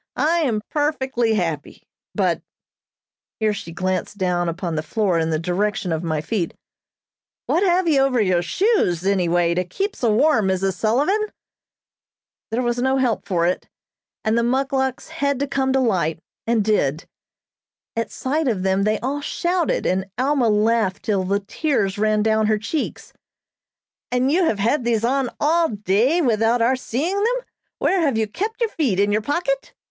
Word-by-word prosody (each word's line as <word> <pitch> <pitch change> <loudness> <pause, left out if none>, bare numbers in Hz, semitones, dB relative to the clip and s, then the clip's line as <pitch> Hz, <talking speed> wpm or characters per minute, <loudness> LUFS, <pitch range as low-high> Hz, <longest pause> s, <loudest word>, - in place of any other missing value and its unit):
I 320 +6 +2
am 230 -9 0
perfectly 265 -6 0
happy; 165 -7 -3 0.3
but - - +1 0.5
" - - -73
(here 215 -1 +2
she 200 -4 -7
glanced 185 +3 -2
down 175 -2 0
upon 170 0 -3
the 155 - -1
floor 190 0 0
in 160 0 0
the 160 - +1
direction 190 +3 -1
of 160 -1 -1
my 160 -3 -1
feet) 180 0 -2 0.9
"what 345 - +1
have 365 -2 +2
you 295 -4 +4
over 270 -2 +2
your 185 -5 +2
shoes, 185 - +1
any 190 -3 +2
way, 170 0 +2
to 180 +1 0
keep 395 - -3
so 235 -3 +1
warm, 225 -2 +3
Mrs. 190 0 0
Sullivan?" 285 - +1 1.3
There 235 +3 -1
was 240 0 0
no 265 +1 +2
help 250 -5 0
for 170 -3 +1
it, 180 - -1 0.6
and 220 +1 +2
the 235 - +3
muckluks 265 +2 0
had 285 -4 -1
to 280 - +1
come 270 -1 0
to 265 - +3
light, 180 -10 +1 0.3
and 230 -2 +2
did. 165 -8 0 0.9
At 230 0 -2
sight 295 +3 -1
of 205 -7 0
them 190 +1 +1
they 215 0 +1
all 275 +4 -2
shouted, 345 +3 -1
and 190 +1 0
Alma 260 -2 +2
laughed 215 -2 +1
till 200 -3 0
the 200 +2 0
tears 205 -3 -1
ran 215 0 +2
down 220 0 +2
her 215 0 +2
cheeks. 255 +8 -4 1.0
"And 250 +2 +2
you 355 +3 +3
have 225 - +1
had 235 +7 +1
these 230 -1 +1
on 265 0 +1
all 330 +2 +3
day 215 - +1
without 225 -1 +2
our 235 +3 +3
seeing 285 - -2
them? 485 +4 0 0.3
Where 380 -1 +1
have 280 -8 +1
you 220 - +2
kept 420 - -4
your 460 - +2
feet, 245 - 0
in 205 +1 +3
your 210 +1 +1
pocket?" 355 - -2
225 Hz, 175 wpm, -21 LUFS, 195-280 Hz, 1.3 s, you